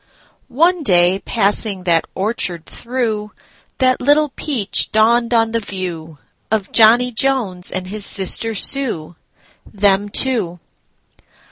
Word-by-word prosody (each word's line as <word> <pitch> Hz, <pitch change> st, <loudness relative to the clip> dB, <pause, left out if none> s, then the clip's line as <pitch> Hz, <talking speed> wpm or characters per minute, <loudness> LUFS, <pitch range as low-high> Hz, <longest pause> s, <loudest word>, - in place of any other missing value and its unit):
One 335 Hz, +6 st, +1 dB
day, 180 Hz, -6 st, +3 dB
passing 200 Hz, -2 st, 0 dB
that 170 Hz, -2 st, +1 dB
orchard 190 Hz, -5 st, -3 dB
through, 225 Hz, -4 st, -4 dB, 0.4 s
That 255 Hz, -1 st, +1 dB
little 295 Hz, +3 st, +3 dB
peach 260 Hz, -7 st, -1 dB
dawned 230 Hz, +2 st, +2 dB
on 225 Hz, -1 st, +2 dB
the 230 Hz, -, 0 dB
viewOf 175 Hz, -6 st, -6 dB, 0.5 s
Johnny 235 Hz, +3 st, +5 dB
Jones 225 Hz, -8 st, -1 dB
and 185 Hz, -1 st, -4 dB
his 205 Hz, +3 st, -6 dB
sister 210 Hz, +4 st, 0 dB
Sue—Them 200 Hz, -, -1 dB
two. 205 Hz, -8 st, 0 dB
215 Hz, 105 wpm, -17 LUFS, 185-245 Hz, 0.5 s, Johnny